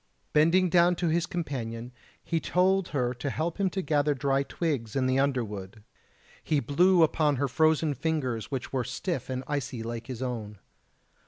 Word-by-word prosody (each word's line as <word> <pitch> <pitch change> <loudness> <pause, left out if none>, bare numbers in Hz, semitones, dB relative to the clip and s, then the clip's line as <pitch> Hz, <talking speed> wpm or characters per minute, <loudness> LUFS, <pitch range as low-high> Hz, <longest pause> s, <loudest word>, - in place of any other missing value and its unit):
Bending 165 +5 +4
down 175 0 +4
to 170 -1 0
his 170 +2 +1
companion 125 -10 -4 0.3
he 165 - -1
told 185 +2 +2
her 125 -4 -1
to 130 +3 -4
help 165 +6 -3
him 195 -1 +2
to 190 +1 -3
gather 145 -2 +1
dry 135 0 +1
twigs 140 -7 -3
in 135 -1 +1
the 130 +1 +2
underwood; 110 -7 -2 0.6
he 150 - +1
blew 170 +7 +4
upon 150 -2 +2
her 140 +2 0
frozen 155 +2 +2
fingers 135 -5 -2
which 135 -2 -4
were 130 -2 0
stiff 130 +4 -4
and 130 0 -3
icy 130 -5 -3
like 115 0 -5
his 130 -1 -5
own. 110 -5 -4
140 Hz, 170 wpm, -28 LUFS, 125-165 Hz, 0.6 s, Bending